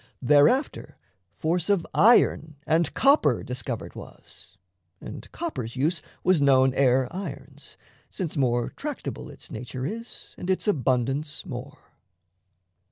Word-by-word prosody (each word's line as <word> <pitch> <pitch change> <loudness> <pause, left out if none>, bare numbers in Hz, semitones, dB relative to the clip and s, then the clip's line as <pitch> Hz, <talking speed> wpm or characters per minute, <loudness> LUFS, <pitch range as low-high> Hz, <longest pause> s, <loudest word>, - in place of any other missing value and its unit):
Thereafter 150 - +3 0.4
force 170 +3 0
of 195 -5 +2
iron 180 -9 +4
And 160 +1 +2
copper 275 +2 +4
discovered - - -5
was; - - -11 0.4
and - - -9
copper's 130 - -5
use 155 +6 0 0.2
Was 180 -4 +3
known 135 -2 +5
ere 130 -1 +3
iron's, 190 +3 -8 0.3
since 180 -6 -4
more 120 -4 +1
tractable - - -6
Its - - -11
nature 125 +3 -5
is 230 +9 -7
and 180 - -5
its 190 +3 0
abundance 135 - 0
more. 140 +3 -7
150 Hz, 115 wpm, -26 LUFS, 130-185 Hz, 0.4 s, known